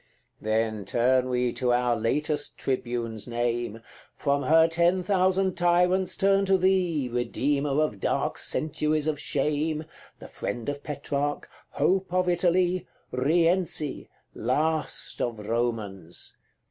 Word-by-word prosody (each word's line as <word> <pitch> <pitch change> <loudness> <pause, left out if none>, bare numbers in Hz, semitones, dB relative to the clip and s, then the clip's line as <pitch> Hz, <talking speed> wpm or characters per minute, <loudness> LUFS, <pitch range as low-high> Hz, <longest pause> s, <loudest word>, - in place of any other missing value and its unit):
CXIV. - - -21
Then 110 -1 0
turn 125 +4 +2
we 125 -1 0
to 125 -2 0
our 120 0 +2
latest 145 +6 -1
tribune's 120 -4 -3
name, 120 -1 -2 0.3
From 140 -1 0
her 160 +4 +5
ten 170 +3 +2
thousand 190 0 +2
tyrants 180 +2 +2
turn 195 0 +3
to 195 0 +4
thee, 180 -7 +1
Redeemer 140 +4 0
of 150 -10 0
dark - - -1
centuries 155 0 0
of 155 -2 -1
shame 150 +2 -1 0.3
The - - -11
friend 120 -2 -5
of 145 0 -4
Petrarch 145 0 -3 0.2
hope 185 +5 +1
of 185 0 +1
Italy 180 0 +2 0.2
Rienzi! 165 +2 +1 0.2
last 155 +6 -1
of 120 -2 -1
Romans! 105 -5 -3
145 Hz, 120 wpm, -26 LUFS, 120-175 Hz, 0.3 s, her